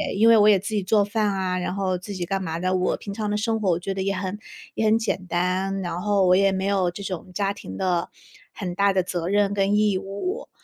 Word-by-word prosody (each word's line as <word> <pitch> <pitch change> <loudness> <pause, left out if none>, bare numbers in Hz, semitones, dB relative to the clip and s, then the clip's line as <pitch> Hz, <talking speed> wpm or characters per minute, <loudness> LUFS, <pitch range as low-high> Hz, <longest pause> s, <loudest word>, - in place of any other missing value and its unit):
因 220 +3 +4
为 230 -1 +7
我 210 0 +6
也 200 -3 +5
自 205 +3 -4
己 205 - 0
做 205 +1 +3
饭 215 +1 0
啊， 185 -1 -1
然 180 0 -2
后 190 -2 -1
自 185 +3 -8
己 180 -2 -3
干 195 +1 -2
嘛 165 0 -3
的， 185 +1 0
我 185 0 0
平 200 - -7
常 210 0 -3
的 210 - 0
生 225 0 -1
活 195 - +1
我 170 - 0
觉 195 +2 -3
得 190 - -3
也 195 - 0
很 190 +1 -3 0.4
也 220 - -1
很 220 +1 +4
简 195 -4 -2
单， 185 +3 -1
然 175 0 -4
后 200 -2 +2
我 180 - +6
也 195 0 +4
没 190 0 -2
有 190 -3 +1
这 190 +3 -8
种 185 -2 -6
家 200 0 0
庭 95 - -9
的， 175 -2 0 0.4
很 180 -4 -5
大 200 +1 +3
的 190 -1 +2
责 175 -1 -3
任 205 0 +2
跟 200 0 +1
义 210 -2 +2
务。 205 - -5
195 Hz, 280 characters per minute, -24 LUFS, 185-205 Hz, 0.4 s, 为